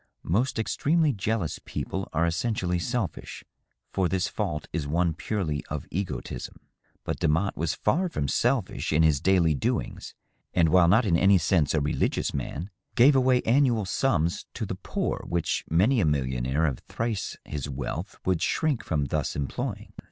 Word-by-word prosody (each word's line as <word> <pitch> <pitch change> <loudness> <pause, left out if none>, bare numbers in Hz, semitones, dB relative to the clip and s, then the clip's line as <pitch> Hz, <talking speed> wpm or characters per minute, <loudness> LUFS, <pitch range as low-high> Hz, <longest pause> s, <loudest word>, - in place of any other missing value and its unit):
Most 120 +11 +1
extremely 150 +7 +2
jealous 100 -5 -2
people 95 0 -4
are 80 +2 +1
essentially 90 0 0
selfish, 110 - -3 0.5
for 95 -3 +1
this 95 0 0
fault 85 -8 -3
is 80 -4 -2
one 85 +2 +1
purely 80 -5 -2
of 75 -3 -4
egotism; 90 -8 -4 0.5
but - - -3
Demotte 85 +7 +1
was 80 0 -1
far 175 - +1
from 70 - -2
selfish - - 0
in 80 +1 +4
his 75 -3 +3
daily 90 -4 +4
doings, 70 - -3 0.4
and, 85 -3 +4
while 90 0 +5
not 110 +7 +5
in 90 -5 +3
any 95 +3 +5
sense 80 -3 +2
a 75 - +2
religious 75 - 0
man, 75 +8 -4 0.2
gave 135 +4 +6
away 130 -1 +3
annual 120 -3 +3
sums 90 -5 0
to - - -3
the - - -4
poor - - -3
which 85 -2 -1
many 105 - +3
a - - +3
millionaire 65 0 0
of 70 -6 -1
thrice 115 -3 -3
his 75 -2 -4
wealth 65 -2 -5
would 90 -3 +1
shrink 150 -7 0
from 75 -4 0
thus 75 0 -2
employing. 70 -1 -4
85 Hz, 160 wpm, -27 LUFS, 75-110 Hz, 0.5 s, gave